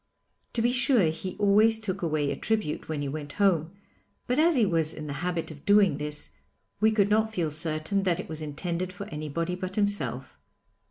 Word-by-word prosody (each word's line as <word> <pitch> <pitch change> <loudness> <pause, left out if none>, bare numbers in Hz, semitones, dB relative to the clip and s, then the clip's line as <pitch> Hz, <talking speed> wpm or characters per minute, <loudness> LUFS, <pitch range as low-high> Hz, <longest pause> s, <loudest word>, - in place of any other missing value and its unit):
To 230 - 0
be 240 - +3
sure, 245 - +3
he 180 +3 -6
always 210 +2 +4
took 195 -3 -4
away 155 -4 0
a - - -2
tribute 215 -11 -2
when 150 -2 -2
he - - -2
went 145 +1 -5
home, 180 -4 +2 0.5
but 250 +4 0
as 330 +1 +4
he 235 -5 +4
was 165 -4 0
in 155 - -7
the 145 - -4
habit 175 -2 -2
of 145 -2 -12
doing 205 -7 +4
this, 150 0 -4 0.5
we 220 +2 +4
could 210 -2 +2
not 220 +1 +3
feel 170 -7 -1
certain 155 +5 0
that 180 -2 +1
it - - -5
was 155 0 -4
intended 170 +4 -3
for 190 +2 -7
anybody 155 +3 -3
but 185 +1 -5
himself. 140 - -1
180 Hz, 200 wpm, -27 LUFS, 155-205 Hz, 0.5 s, always